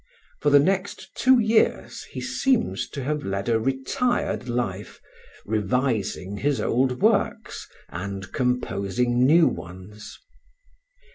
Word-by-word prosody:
For 150 Hz, -, +3 dB
the 145 Hz, -, +7 dB
next 190 Hz, +6 st, 0 dB
two 260 Hz, 0 st, +4 dB
years 220 Hz, 0 st, +1 dB
he -, -, -8 dB
seems 260 Hz, -4 st, 0 dB
to 140 Hz, -, -6 dB
have 150 Hz, +2 st, -2 dB
led 100 Hz, +2 st, -3 dB
a 115 Hz, -1 st, +2 dB
retired 135 Hz, -, -1 dB
life, 105 Hz, -5 st, -3 dB, 0.5 s
revising 105 Hz, -2 st, -1 dB
his 140 Hz, +4 st, 0 dB
old 125 Hz, +1 st, 0 dB
works -, -, 0 dB, 0.2 s
and 95 Hz, +2 st, -6 dB
composing 125 Hz, -1 st, 0 dB
new 165 Hz, +2 st, +6 dB
ones. 95 Hz, +4 st, -8 dB
125 Hz, 115 wpm, -24 LUFS, 100-145 Hz, 0.5 s, the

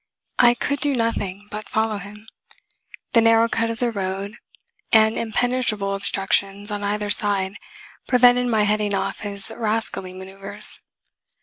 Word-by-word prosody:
I 240 Hz, -1 st, +6 dB
could 280 Hz, +3 st, -2 dB
do 290 Hz, -2 st, +3 dB
nothing 205 Hz, -4 st, -2 dB
but 210 Hz, -1 st, -7 dB
follow 220 Hz, -1 st, -1 dB
him. 210 Hz, +3 st, -12 dB, 0.9 s
The 230 Hz, -, +5 dB
narrow 225 Hz, 0 st, +4 dB
cut 230 Hz, 0 st, -1 dB
of 230 Hz, -, -4 dB
the 240 Hz, 0 st, -1 dB
road 200 Hz, +1 st, -4 dB, 0.5 s
and 220 Hz, 0 st, +5 dB
impenetrable 230 Hz, -3 st, -1 dB
obstructions 195 Hz, +1 st, 0 dB
on 205 Hz, 0 st, -3 dB
either 205 Hz, 0 st, -1 dB
side 200 Hz, -1 st, +1 dB, 0.5 s
prevented 245 Hz, 0 st, +4 dB
my 220 Hz, -3 st, +2 dB
heading 210 Hz, -1 st, 0 dB
off -, -, -3 dB
his 200 Hz, -1 st, -3 dB
rascally 215 Hz, -4 st, -3 dB
maneuvers. 195 Hz, +2 st, +1 dB
210 Hz, 135 wpm, -22 LUFS, 200-230 Hz, 0.9 s, I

